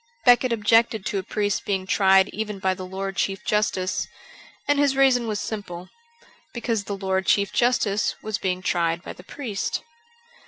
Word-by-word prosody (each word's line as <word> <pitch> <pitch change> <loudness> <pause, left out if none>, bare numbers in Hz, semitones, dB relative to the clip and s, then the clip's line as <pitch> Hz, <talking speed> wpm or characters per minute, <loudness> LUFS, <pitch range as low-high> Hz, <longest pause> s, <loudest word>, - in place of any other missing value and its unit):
Becket 245 0 +5
objected 225 -1 +2
to 200 - -1
a - - -2
priest 205 0 -1
being 190 -2 -2
tried 190 0 +4
even 210 -1 -4
by 190 0 0
the 185 0 -7
Lord 195 +1 -5
Chief 195 -1 -1
Justice. 205 -3 0 0.6
And 290 0 +2
his 285 -2 +3
reason 260 -3 +3
was 215 -2 -2
simple: 185 -4 -6 0.7
because 230 -3 -2
the 200 - -4
Lord 190 -1 -1
Chief 200 -1 +2
Justice 215 -4 +1
was 215 -2 -3
being 185 -1 -2
tried 170 -1 0
by - - -7
the - - -14
priest. 215 -2 -4
200 Hz, 165 wpm, -24 LUFS, 190-225 Hz, 0.7 s, Becket